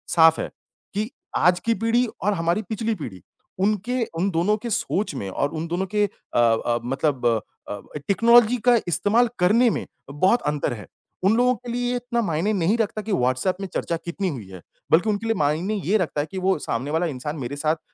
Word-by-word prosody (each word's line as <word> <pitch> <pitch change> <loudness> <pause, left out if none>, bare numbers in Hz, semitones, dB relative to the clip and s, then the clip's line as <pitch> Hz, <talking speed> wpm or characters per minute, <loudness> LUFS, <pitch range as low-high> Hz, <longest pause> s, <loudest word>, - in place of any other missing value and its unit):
साफ़ 160 -1 +6
है - - -4 0.4
कि 215 +3 -1 0.3
आज 175 0 +4
की 230 +6 +1
पीढ़ी 235 +2 +3 0.2
और 205 +2 +2
हमारी 170 +3 0
पिछली 225 +1 -1
पीढ़ी, 115 - -8 0.4
उनके 215 +5 +1 0.2
उन 190 +3 +2
दोनों 175 +6 +2
के 235 +2 -6
सोच 215 -4 -1
में 100 -7 -4
और 140 +9 -1
उन 160 +1 -4
दोनों 175 +3 -1
के 210 0 +4
अ 160 - -5
अ, 120 0 +2
मतलब 135 +1 -1 0.4
अ, 105 - -4 0.3
टेक्नोलॉज़ी 235 +3 +5
का 245 - +7
इस्तेमाल 225 +7 +2
करने 220 +7 +4
में - - -2 0.3
बहुत 185 +11 +3
अंतर 150 -4 0
है, 105 -3 -9 0.4
उन 200 +4 +4
लोगों 250 +1 +4
के 245 0 -8
लिए 245 0 -1
ये - - 0
इतना 240 -1 -1
मायने 175 0 0
नहीं 195 +3 +2
रखता 215 -1 -1
कि 215 0 -6
व्हाट्सएप 130 +5 +1
में 195 - -3
चर्चा 170 - -1
कितनी 190 +3 -2
हुई 120 - -6
है, 90 -2 -10 0.3
बल्कि 175 +7 +4
उनके 210 +1 -1
लिए 225 - +1
मायने 155 +7 0
ये 200 +6 +3
रखता 165 -6 -1
है 150 - -4
कि 190 - -6
वो 190 0 +2
सामने 130 +2 -3
वाला 165 +3 +1
इंसान 150 0 -4
मेरे 135 +1 -4
साथ 155 +2 +1
अ, - - -26
185 Hz, 210 wpm, -23 LUFS, 150-220 Hz, 0.4 s, का